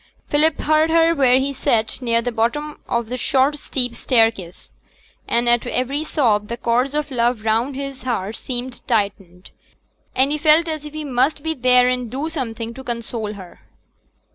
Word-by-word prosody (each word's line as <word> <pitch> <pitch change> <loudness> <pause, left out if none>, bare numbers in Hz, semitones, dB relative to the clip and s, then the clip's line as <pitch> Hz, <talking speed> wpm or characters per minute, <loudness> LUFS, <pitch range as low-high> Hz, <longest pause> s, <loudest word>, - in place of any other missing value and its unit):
Philip 300 +1 +2
heard 310 +1 +3
her 330 0 +4
where 260 -5 +4
he 275 +1 -1
sate 235 -4 0
near 230 -1 +1
the 245 - -2
bottom 240 +7 -2
of 235 -1 -1
the 250 +2 -4
short 275 +3 +1
steep 250 -4 -1
staircase, 225 -9 0 0.6
and 235 +1 +1
at 240 0 +2
every 265 +5 -1
sob 225 -10 +1
the 235 - -4
cords 250 +5 0
of 300 -1 -2
love 240 -2 +1
round 230 +5 +1
his 275 -1 -6
heart 225 -4 -3
seemed 250 +1 -5
tightened, 200 -5 -2 0.6
and 265 +2 +3
he 300 - -1
felt 315 +2 +4
as 310 -2 -4
if 300 - -12
he 310 0 -5
must 275 +3 0 0.2
there 250 0 +5
and 250 0 0
then - - -9
do 310 +3 -2
something 235 -7 -4
to 265 +2 -10
console 230 -3 -4
her. 185 -4 -12
250 Hz, 175 wpm, -20 LUFS, 230-285 Hz, 0.6 s, there